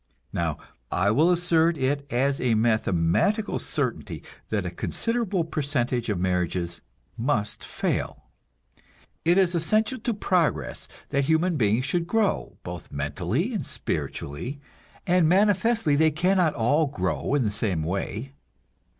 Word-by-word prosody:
Now, 80 -3 -1 0.3
I 95 +3 +2
will 155 +10 +4
assert 170 -2 +3
it 140 +1 -1
as 135 +3 +1
a 120 -3 +2
mathematical 110 - +1
certainty - - -3 0.3
that - - -1
a - - -3
considerable 230 -6 -1
percentage 135 -6 -1
of 100 -4 0
marriages 90 -1 -1 0.4
must 110 -4 -1
fail. 70 - -2 1.0
It 175 +3 +4
is 185 -2 +4
essential 215 +9 +1
to 235 +1 -1
progress 165 - 0 0.2
that 140 0 +1
human 160 +3 +2
beings 115 -1 +2
should 170 +3 0
grow, 220 0 0
both - - -8
mentally 70 0 -2
and - - -2
spiritually, 90 - -4 0.5
and 180 -4 +4
manifestly 205 -2 +3
they 160 +2 +4
cannot 175 +1 +2
all 145 +7 +2
grow 95 +2 -1
in 140 - +2
the 105 - 0
same 100 -6 -1
way. 100 - -3
145 Hz, 130 wpm, -26 LUFS, 105-175 Hz, 1.0 s, will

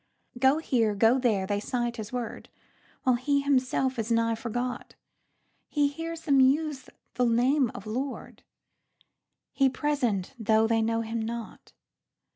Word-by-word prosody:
Go 265 +3 +4
here, 230 -9 +1
go 225 +5 +4
there, 215 -7 +1
they 205 +1 -1
cite 240 +2 -2
his 215 -1 -6
word, 245 -2 -5 0.5
While 255 -2 +3
he 280 +3 +1
himself 260 -2 +1
is 225 +1 -2
nigh 230 0 +2
forgot. 245 +2 -4 0.7
He 290 -1 +2
hears 330 +3 -6
them 275 -3 +3
use 270 -1 +2 0.2
the 250 +1 +1
name 250 +3 +3
of - - -8
Lord, 255 +6 -5 1.1
He 270 -1 +3
present 255 -9 -1
though 220 0 +3
they 225 0 +2
know 225 +1 0
him 225 0 -3
not. 230 0 -7
245 Hz, 140 wpm, -27 LUFS, 225-270 Hz, 1.1 s, Go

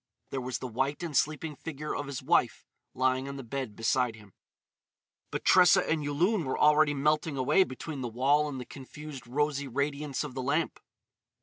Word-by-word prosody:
There 135 - -2
was 125 0 -3
the 130 - -5
white 135 +7 -2
and 160 -4 -4
sleeping 155 +1 0
figure 150 +1 -5
of 145 - -4
his 140 -2 -5
wife - - +2 0.3
lying 130 +1 +1
on 140 - -6
the 135 - -7
bed 125 -2 -5
beside 120 +1 +1
him. 105 -3 -16 1.0
But - - -5
Tressa 180 -2 +6
and 155 -2 0
Yulun 170 +7 +1
were 130 - -2
already 150 0 +4
melting 150 +1 +1
away 130 +9 +4
between 135 +2 -6
the 125 - -2
wall 140 +6 +2
and 135 -2 -5
the 125 - -6
confused 140 -2 -10
rosy 145 +2 0
radiance 140 +2 -2
of 145 -3 -6
the 130 - -4
lamp. 145 +6 0
140 Hz, 185 wpm, -29 LUFS, 130-150 Hz, 1.0 s, Tressa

